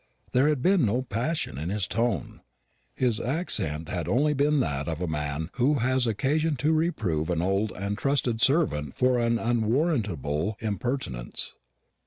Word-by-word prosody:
There 130 +4 +4
had 145 -4 0
been 185 -4 +4
no 120 +4 +1
passion 125 - -2
in 80 +4 -3
his 100 0 0
tone. 115 -7 -2 0.5
His 120 -4 +1
accent 100 - 0
had 85 -2 -3
been - - 0
only 150 +3 +3
that 135 - +1
of 80 -2 -3
a 90 - -1
man 75 +2 -3
who 135 +4 +3
has 130 0 +1
occasion 145 +9 +1
to 145 +5 +1
reprove 110 - 0
an 85 -2 0
old 95 +3 +1
and 100 +2 -3
trusted 125 -2 0
servant 120 - +2
for 125 -1 +2
an 115 0 +2
unwarrantable 110 - 0
impertinence. 105 - -2
115 Hz, 155 wpm, -27 LUFS, 85-135 Hz, 0.5 s, There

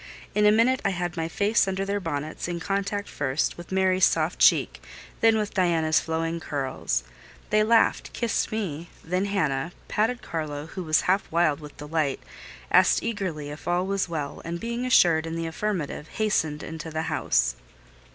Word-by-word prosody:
In 210 0 +4
a - - +7
minute 235 +4 +3
I - - +2
had 175 -2 -3
my 165 -1 -2
face 200 +5 +2
under 190 0 -1
their 200 +1 -1
bonnets, 155 -4 -4
in 175 -1 -3
contact 200 +2 -2
first 145 +1 -1
with 175 +1 -11
Mary's 190 -1 +2
soft - - 0
cheek, - - +4 0.4
then 225 -1 +5
with 210 -1 -2
Diana's 165 -4 +2
flowing 165 +1 -2
curls. 130 - -2 0.5
They 215 0 +4
laughed—kissed 230 +1 +1
me—then 180 -2 -3
Hannah: 165 -6 -1
patted 230 +3 0
Carlo, 150 -3 -4
who 185 +4 -7
was 155 -1 +3
half 190 +2 0
wild 165 -3 +2
with 150 -2 -11
delight; 150 -2 -1 0.5
asked - - +5
eagerly 180 -10 -3
if 150 - -10
all 175 +1 +1
was 195 -2 -1
well; 150 -4 -4
and 170 +1 -4
being 235 +3 -3
assured 165 -9 +4
in 165 - -4
the 165 0 -2
affirmative, 165 -3 -3
hastened 160 -9 -1
into 160 0 -6
the 160 0 -2
house. 155 - +1
170 Hz, 165 wpm, -26 LUFS, 155-200 Hz, 0.5 s, a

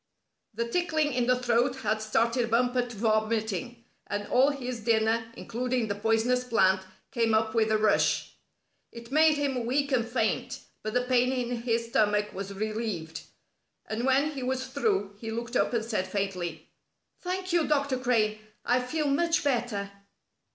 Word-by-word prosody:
The 235 +1 -1
tickling 310 0 0
in 245 -1 0
the 250 - +4
throat 245 +1 +1
had 215 0 0
started 230 +2 +1
Bumper 245 +2 +2
to 240 - -9
vomiting, 220 +1 -1 0.2
and 205 0 -3
all 260 +3 +5
his 255 -4 -4
dinner, 225 0 +1
including 245 0 -2
the - - +1
poisonous 225 +4 +1
plant, 190 -6 +3 0.3
came 230 -3 +2
up 220 0 +1
with 220 -2 +2
a 215 - +3
rush. 215 -1 +2 0.6
It 235 +1 -11
made 310 +1 +5
him 270 -4 -1
weak 280 +3 0
and 250 -3 +3
faint, 240 +2 -1 0.2
but 215 +2 -4
the 250 - +3
pain 250 0 +2
in 245 -2 -2
his 230 -1 -1
stomach 210 -2 +1
was 195 +1 -5
relieved, 205 -6 -4 0.6
and 220 +2 -3
when 270 +4 +3
he 275 -3 -6
was 260 +1 -2
through 255 - -1
he 225 - -6
looked 235 +2 -4
up - - +2
and 230 -2 -1
said 215 -5 -1
faintly: 180 -5 -3 0.5
"Thank 370 0 -3
you, 340 -3 +3
Dr. 280 -3 +1
Crane, 220 -4 +1 0.3
I 245 +1 +3
feel 300 +5 -2
much 330 +5 +2
better." 235 -7 -1
235 Hz, 165 wpm, -28 LUFS, 215-255 Hz, 0.6 s, all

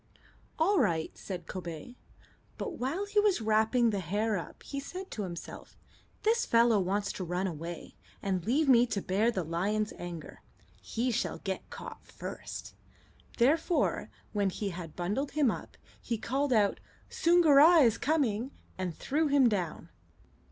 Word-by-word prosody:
"All 370 +4 +3
right," 165 - 0
said 180 -4 -6
Kobay; 175 +6 -7 0.6
but 395 -8 -5
while 315 +11 -1
he 415 +1 +1
was 415 -6 +3
wrapping 220 +2 +3
the 200 - -1
hare 205 +5 0
up 175 - -7
he 280 - -5
said 365 +7 -7
to 215 - -4
himself: 175 -4 -7 0.5
"This 460 +2 +3
fellow 230 -2 +4
wants 195 +2 0
to 185 - -5
run 180 +2 -1
away, 170 -1 -6 0.3
and 190 -3 -1
leave 275 - +2
me 245 -2 +6
to 210 - -1
bear 205 +5 +2
the 190 -6 -1
lion's 200 +7 -1
anger. 175 -2 -7 0.4
He 245 +3 -1
shall 240 - -1
get 190 -1 -5
caught - - -9
first." - - -7 0.6
Therefore, 315 +8 +2 0.2
when 200 -2 +1
he 200 +2 -3
had 170 -3 -7
bundled 210 +11 -2
him 285 -5 +3
up, - - -8 0.2
he 230 - -2
called 270 +5 -1
out, 210 -4 +3 0.3
"Soongoora 330 -1 +6
is 230 - +2
coming!" 260 -5 +1 0.3
and 180 -3 -2
threw 305 +3 0
him 280 -3 +5
down. 185 -7 -2
220 Hz, 150 wpm, -30 LUFS, 185-280 Hz, 0.6 s, me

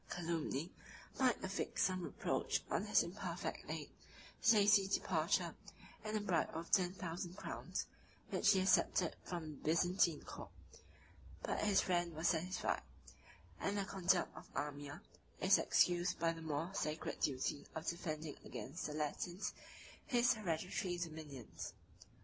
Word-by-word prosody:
Calumny 165 -2 -2 0.5
might 255 -3 +3
affix 190 +1 -1
some 185 -1 +1
reproach - - -1
on - - +1
his - - +5
imperfect - - -4
aid, - - -4 0.5
his 225 - +6
hasty 205 -2 +6
departure, 195 - +1 0.5
and 215 0 -1
a - - +1
bribe 185 -6 +1
of 165 +1 -5
ten 180 -3 +4
thousand 175 0 -5
crowns, - - -3 0.5
which 205 - +5
he 190 -2 +4
accepted 185 -2 +3
from 170 -3 -4
the 145 - -10
Byzantine 170 0 +2
court; - - -8 0.9
but - - -1
his 205 -2 +4
friend 175 -2 0
was 160 +2 +2
satisfied; 180 +3 0 0.8
and 200 +1 0
the 200 - 0
conduct 185 -2 +2
of - - -11
Amir 145 -1 -4 0.4
is - - +6
excused 175 0 +3
by 165 0 +2
the 165 - -9
more 160 +2 -2
sacred 155 -4 -2
duty 140 +1 0
of 160 0 -4
defending 155 -3 -3
against 130 +8 -5
the 150 - -5
Latins 175 +5 -2 0.5
his 245 -2 +4
hereditary 180 -2 -1
dominions. 155 -7 -6
175 Hz, 140 wpm, -38 LUFS, 160-190 Hz, 0.9 s, his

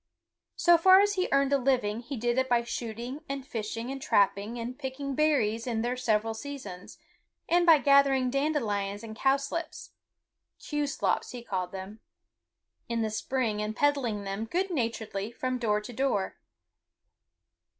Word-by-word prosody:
So 345 -1 +5
far 375 +2 +8
as 410 0 +2
he 370 -2 0
earned 275 0 +3
a 280 - +4
living 245 -5 +1
he 255 +3 -6
did 240 +2 +1
it 260 0 0
by 240 -1 +3
shooting 240 +5 -5
and 275 -1 -4
fishing 230 +1 -4
and 270 0 -6
trapping 205 +1 +1
and 240 +2 -5
picking 275 0 -4
berries 255 -7 +1
in 225 -2 -1
their 245 +1 -1
several 225 -3 0
seasons, 220 -8 -8 0.5
and 345 +1 +3
by 325 -2 +9
gathering 275 -2 +4
dandelions 225 -8 -1
and 220 -1 -8
cowslips 275 +6 -1 0.7
(kew 295 -1 -2
slops 275 - -1
he 245 -1 -7
called 185 -5 -3
them) 195 +3 -8 0.9
in 230 -1 0
the 220 - -1
spring 220 -1 -1
and 210 +1 -3
peddling 265 -8 +1
them 195 +3 -3
good 365 - -1
naturedly 225 - -2
from 255 +1 -3
door 210 -3 +1
to 210 +3 -9
door. 220 -6 -1
245 Hz, 155 wpm, -29 LUFS, 220-275 Hz, 0.9 s, by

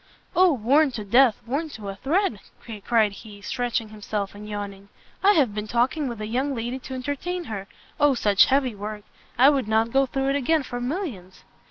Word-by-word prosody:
"O 365 -1 +6
worn 275 +4 +3
to 215 -3 -5
death! 240 +2 +4
worn 285 +7 -2
to 215 -7 -9
a 195 - -5
thread!" 285 - 0 0.4
cried 220 -3 +3
he, 205 +1 -12
stretching 235 +1 -2
himself, 210 -1 -4
and 210 +1 -10
yawning; 200 -1 -6 0.3
"I 405 +2 +6
have 270 - +2
been 210 0 -4
talking 255 +6 +1
with 235 -3 -5
a 215 - -4
young 260 +5 -1
lady 240 +3 -3
to 265 0 -7
entertain 285 +7 -3
her! 200 - -6 0.3
O 290 -2 +4
such 205 -4 +5
heavy 265 -3 +1
work! 210 +1 -6 0.3
I 265 +4 +7
would 270 -6 0
not 220 +1 +2
go 270 0 +3
through 270 +1 -1
it 275 - +1
again 290 +2 +2
for 245 -1 -5
millions! 245 - -5
240 Hz, 195 wpm, -24 LUFS, 210-275 Hz, 0.4 s, I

